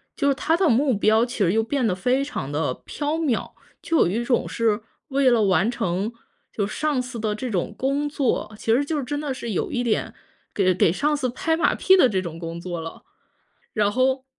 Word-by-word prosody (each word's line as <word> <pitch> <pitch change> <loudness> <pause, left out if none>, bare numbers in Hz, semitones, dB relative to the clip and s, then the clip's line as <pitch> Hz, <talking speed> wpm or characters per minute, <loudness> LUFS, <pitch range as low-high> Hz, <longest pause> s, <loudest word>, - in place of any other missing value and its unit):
就 280 - 0
是 280 - +4
它 320 +5 +1
的 370 -1 +3
目 255 -2 +3
标 220 +3 +4
其 245 0 -7
实 190 -4 +2
又 225 +1 +2
变 260 +2 -1
得 185 - 0
非 250 +8 +1
常 145 - -5
地 145 -3 -1
飘 295 0 -3
渺， 300 -8 -1 0.3
就 330 - 0
有 - - +4
一 215 +7 -1
种 240 0 +1
是 225 -2 0 0.3
为 275 -1 +3
了 235 -3 +3
完 195 +2 +3
成 205 -2 -2 0.4
就 205 - 0
上 290 +4 -1
司 250 -1 -7
的 215 -1 -1
这 250 +4 -4
种 190 +1 -1
工 280 +3 0
作， 260 -6 -1
其 225 - +1
实 260 +5 +3
就 300 0 -1
真 290 +3 -3
的 290 -2 -3
是 235 -3 -5
有 190 - -1
一 245 - -1
点 230 -3 -1 0.4
给 185 -2 +3
给 175 -2 +3
上 295 +9 +1
司 260 -3 -1
拍 320 +6 0
马 - - +2
屁 380 0 +5
的 310 - +6
这 195 -5 0
种 165 -2 -7
工 165 0 -6
作 175 -1 -5
了。 165 0 -8 0.7
然 210 -2 +2
后 260 +2 +1
240 Hz, 240 characters per minute, -23 LUFS, 200-280 Hz, 0.7 s, 的